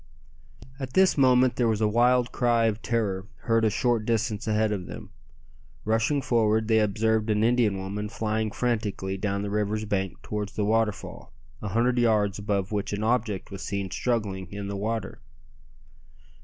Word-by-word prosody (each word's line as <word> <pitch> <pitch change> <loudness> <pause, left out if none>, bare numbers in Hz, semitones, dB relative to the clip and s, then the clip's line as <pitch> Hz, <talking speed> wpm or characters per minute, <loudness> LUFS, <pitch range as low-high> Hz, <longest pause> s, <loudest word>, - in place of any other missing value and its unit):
At 130 -2 -5
this 190 0 +4
moment 130 -2 +4
there 120 - +2
was 110 -2 +1
a 110 - +2
wild 120 +2 +3
cry 120 -2 +2
of 110 -1 0
terror 105 -4 -1
heard 115 -1 +2
a 110 - +4
short 120 +1 +1
distance 115 -1 -1
ahead 110 0 +2
of 95 -4 -3
them. - - -9 0.7
Rushing 115 +6 +1
forward 110 -2 +2
they 110 -1 +4
observed 110 +1 +1
an 105 0 +2
Indian 115 -4 +2
woman 100 +2 -4
flying 110 +1 -1
frantically 105 -5 -2
down 100 0 -2
the 100 - -4
river's 105 +1 -1
bank 95 -8 -2
towards 105 -1 -4
the 105 - -1
waterfall, 110 -1 -1 0.3
a 105 - -4
hundred 120 +4 +1
yards 105 -4 +2
above 100 -1 -1
which 105 -1 -2
an 105 +1 -2
object 110 -5 -1
was 100 0 -7
seen 100 -2 -3
struggling 100 -7 -2
in 100 0 -5
the 100 - -3
water. 105 - -3
110 Hz, 170 wpm, -26 LUFS, 100-115 Hz, 0.7 s, this